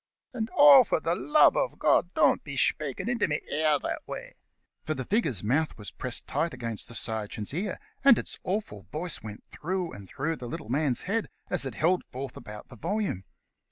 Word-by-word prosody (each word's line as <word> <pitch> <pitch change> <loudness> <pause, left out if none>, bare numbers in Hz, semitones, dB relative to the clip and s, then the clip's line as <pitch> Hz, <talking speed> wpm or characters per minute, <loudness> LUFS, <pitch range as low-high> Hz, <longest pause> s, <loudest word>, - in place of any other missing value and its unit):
And 225 -2 -3
oh, 285 -2 +10
for 210 - 0
the 165 +1 0
love 300 - +5
uv - - -1
God, - - +3
don't - - +4
be - - -6
shpakin' - - 0
into 240 -2 +1
me 150 -1 0
ear 155 0 +3
that - - -3
way;" - - -7 0.5
for 155 - -2
the 130 -1 -4
figure's 155 - 0
mouth 140 +8 +1
was 105 -2 -8
pressed 125 -2 -2
tight 165 -1 -1
against 115 -3 -4
the 120 - -9
sergeant's 110 0 -4
ear, 185 +4 -2 0.2
and 275 -5 +8
its - - -5
awful 180 - -3
voice 165 +2 -3
went 105 -1 -9
through 180 +1 -3
and 100 -2 -10
through 160 +4 -2
the 125 - -7
little 110 - -6
man's 135 -1 +1
head, 215 +4 -1 0.2
as 160 -7 +1
it 125 - -7
held 175 +7 +2
forth 130 0 -7
about 105 0 -10
the 120 - -11
volume. 180 - -2
155 Hz, 195 wpm, -28 LUFS, 120-190 Hz, 0.5 s, oh